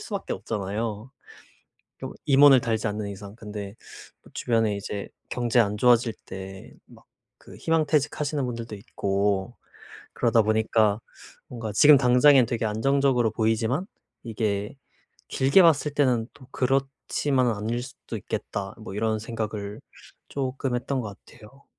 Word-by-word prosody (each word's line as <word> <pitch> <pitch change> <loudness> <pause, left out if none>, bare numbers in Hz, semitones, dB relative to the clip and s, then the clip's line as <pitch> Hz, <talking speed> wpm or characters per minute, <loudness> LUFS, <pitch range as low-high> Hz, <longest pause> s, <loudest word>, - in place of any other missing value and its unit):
수밖에 - - -5
없잖아요 105 +3 -4 0.9
좀 - - -6
임원을 140 -2 +7
달지 115 -2 -1
않는 105 0 -4
이상. 100 0 -9
근데 105 -2 -7 0.5
또 - - -18
주변에 115 -3 +1
이제 100 0 -5 0.2
경제 120 -1 +2
안 105 -1 +1
좋아질 120 0 +3
때 95 0 -9
막 - - -18 0.3
그 - - -15
희망퇴직 155 -2 +1
하시는 150 -1 -1
분들도 115 -2 -5
있고 100 +1 -1 0.6
그러다 115 -1 +3
보니까 110 0 +2 0.5
뭔가 115 -4 -6
'지금 145 +7 +7
당장엔 125 0 +5
되게 115 0 -3
안정적으로 125 +1 +2
보이지만 115 - 0 0.4
이게 105 0 -2 0.5
길게 135 +9 +4
봤을 155 -4 +3
때는 125 -6 +2
또 130 - -16
그렇지만은 135 0 0
않을 115 +4 -2
수도 130 -2 -9
있겠다.' 100 -1 -5
뭐 110 -3 -8
이런 110 0 0
생각을 105 -2 -5 0.5
쪼금 135 -1 -3
했던 130 +2 -2
것 105 -3 -7
같아요. 135 +6 -17
115 Hz, 290 characters per minute, -25 LUFS, 105-130 Hz, 0.9 s, 임원을